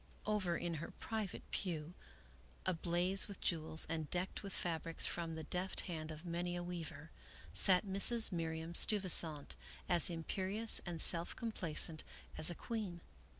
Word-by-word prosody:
Over 195 -5 0
in 175 -1 -4
her - - -6
private 220 -4 -5
pew, 165 -3 -4 0.7
ablaze 180 +2 0
with 200 -2 -9
jewels, 160 -2 -1
and 160 -2 -4
decked 180 +1 -3
with 200 - -8
fabrics 165 -2 -2
from 165 -1 -3
the 160 - -6
deft 180 +4 -3
hand 160 -3 -6
of 155 +2 -9
many 175 +1 -3
a 175 - -4
weaver, 165 -3 -7 0.4
sat 185 +1 +5
Mrs. 210 +4 +4
Miriam 165 -1 -4
Steuvisant 170 -7 +4 0.3
as 175 -1 +7
imperious 190 +6 +2
and 170 -2 -5
self 170 +1 +3
complacent 165 -7 -2 0.3
as 155 - +4
a 175 - -4
queen. 200 -7 -5
175 Hz, 145 wpm, -37 LUFS, 165-190 Hz, 0.7 s, as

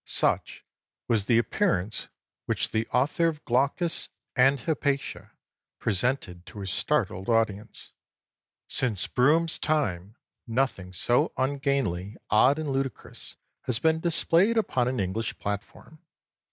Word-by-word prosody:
Such - - 0 0.4
was 110 -4 +2
the 115 - +4
appearance 115 - 0 0.4
which - - 0
the 110 +1 0
author 145 +6 +2
of 155 -2 -4
Glaucus 140 +7 +1 0.3
and 135 +1 +4
Hypatia 140 -1 -2 0.5
presented 95 -4 -1
to 105 - -9
his 95 -1 -3
startled 95 +1 0
audience. 110 -2 -1 0.8
Since 110 -8 0
Brougham's 160 +6 +3
time 105 - -1 0.3
nothing 115 -6 -1
so 120 +7 +1
ungainly, 130 -8 -1
odd, 130 +7 +5
and 155 -3 -2
ludicrous 135 -1 -4 0.3
had 115 -3 0
been 160 0 +3
displayed 170 +6 +2
upon 130 - +1
an 130 -2 -1
English 100 +4 -2
platform. 105 +9 -6
125 Hz, 115 wpm, -27 LUFS, 105-145 Hz, 0.8 s, odd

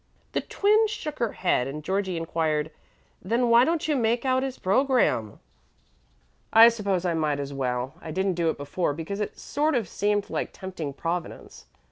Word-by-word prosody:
The - - -1
Twin 425 +2 +2
shook 415 -9 -5
her 235 -3 0
head, 130 -8 +1
and 150 +2 -6
Georgie 190 0 -1
inquired, 160 -2 -1 0.5
"Then 235 +5 +1
why 235 +1 +7
don't 325 +2 0
you 305 - +1
make 235 0 +1
out 260 0 +2
his 265 -1 -4
program?" 200 - +1 1.1
"I 225 +1 +9
suppose 200 -5 -1
I 175 - +1
might 155 -3 0
as 140 0 -5
well. 125 0 -2
I - - -8
didn't 190 +3 0
do 170 -1 0
it - - -2
before 145 +2 -2
because 165 +6 -5
it 210 - -4
sort 300 +1 0
of 230 -6 0
seemed 205 +3 -1
like - - -3
tempting 175 -7 -6
Providence. 170 +3 -5
190 Hz, 175 wpm, -26 LUFS, 160-240 Hz, 1.1 s, I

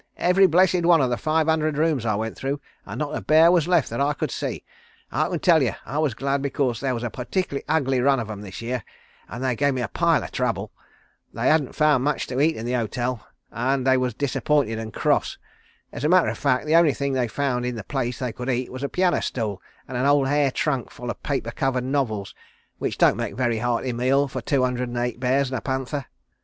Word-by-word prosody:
Every 190 +2 +4
blessed 180 +1 +3
one 170 -1 +5
of 130 -3 +1
the - - +2
five 155 +3 +1
hundred 155 -2 +1
rooms 150 -7 +1
I 110 - +1
went 110 +1 -3
through, 140 +2 -3 0.3
and - - -6
not 150 -1 -3
a - - -3
bear 160 +2 +5
was 175 -3 +3
left 175 -10 +2
that 115 - -2
I 145 +1 +2
could - - -3
see. - - -4 0.5
I - - 0
can - - -1
tell 165 -4 +4
you, 120 -7 +1
I 140 +7 -3
was 150 -7 0
glad, 140 0 -1
because 135 -4 -1
there 135 -2 -1
was 115 - -5
a 120 - -3
partickerly 140 +3 -3
ugly 135 -5 +1
run 135 0 +3
of 115 - -4
'em 105 -2 -7
this 100 +2 -8
year, 120 0 -3 0.5
an' 115 - -7
they 130 -2 0
gave 140 +2 +1
me 125 - -1
a - - -1
pile 170 - +2
o' - - -5
trouble. 110 -5 -2 0.6
They - - +1
hadn't 155 -4 +2
found 150 -4 +3
much 145 0 0
to 125 +1 -3
eat 160 +2 +3
in 110 - -6
the 120 - -2
hotel, 120 0 -2 0.2
an' 130 +3 0
they 130 0 +4
was 125 -3 -1
disappointed 140 -3 0
and 110 -1 -6
cross. - - 0 0.6
As 120 - -6
a 150 - +2
matter 180 0 +5
of - - -4
fact, 140 -2 +1
the 155 +2 +2
only 165 -4 +5
things 140 -1 -1
they 125 -2 +1
found 125 +1 -1
in 125 0 -2
the 110 - -6
place 125 0 -3
they 125 -3 -3
could 125 +3 -5
eat 125 0 -1
was 130 +1 -7
a 140 - -2
piano 180 -1 +1
stool 105 -6 -3 0.3
and 130 - -7
an 130 +3 +1
old 145 -1 +4
hair 145 0 +2
trunk 135 -1 -1
full 120 -1 -6
o' - - -3
paper 135 -5 -3
covered 130 0 -1
novels, 125 -7 -2 0.5
which - - -2
don't - - +4
make - - -3
a - - -12
very 120 -3 0
hearty 120 +1 -1
meal 135 +4 +2
for 130 -1 -5
two 135 +2 +1
hundred 125 -1 -1
and 120 - -5
eight 120 0 -2
bears 130 +1 +1
and 130 - -1
a - - -17
panther." 130 +1 -3
130 Hz, 245 wpm, -24 LUFS, 120-145 Hz, 0.6 s, one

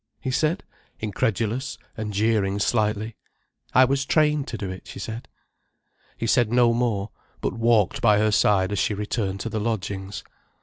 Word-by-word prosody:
he 130 - -3
said, 155 +8 +1 0.4
incredulous, 115 +3 -1 0.2
and 110 -3 -4
jeering 105 -1 +1
slightly. 110 +1 0 0.6
"I 130 - +8
was 135 +1 +1
trained 150 -1 +2
to 115 - -4
do 100 -2 -4
it," 95 - -9
she - - -9
said. 110 +4 -6 0.9
He - - -3
said 115 -1 +3
no 120 -1 +4
more, 110 -4 -1 0.3
but - - -2
walked 115 +3 +2
by 105 -4 +5
her 110 +1 +3
side 100 -2 +3
as 100 - -1
she 105 +2 +1
returned 100 -2 -2
to 115 - -3
the 110 - -2
lodgings. 100 -3 -3
110 Hz, 165 wpm, -24 LUFS, 105-120 Hz, 0.9 s, I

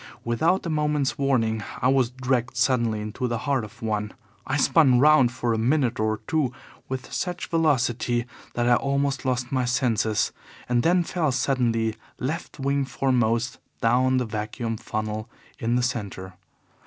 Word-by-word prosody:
Without 160 +13 +1
a - - -2
moment's 150 -2 0
warning 115 -6 +1 0.2
I - - +2
was 130 -3 +3
dragged 125 -1 -1
suddenly 115 -5 +2
into 105 +4 -3
the 120 -1 -1
heart 135 +1 0
of 115 +3 -11
one. 105 -1 -2 0.3
I 135 - 0
spun 140 -3 +5
round 145 -3 +6
for 120 -2 -1
a 110 - 0
minute 125 0 +1
or 110 0 0
two 150 -3 0 0.4
with 130 0 -5
such 180 -1 -3
velocity 125 -7 +1 0.3
that 120 0 +1
I 120 - +5
almost 140 0 -1
lost 125 -1 -1
my 130 -2 +1
senses, 120 -4 +1 0.4
and 120 -1 +2
then 175 +5 +3
fell 165 -4 0
suddenly, 115 -4 0 0.2
left 150 +3 -4
wing 140 +1 +1
foremost, 125 -3 0 0.2
down 130 +2 +3
the 125 - +1
vacuum 110 +1 -3
funnel 110 +1 -4 0.3
in 115 +1 0
the 125 - +2
centre. 100 -6 -3
125 Hz, 155 wpm, -25 LUFS, 115-135 Hz, 0.4 s, round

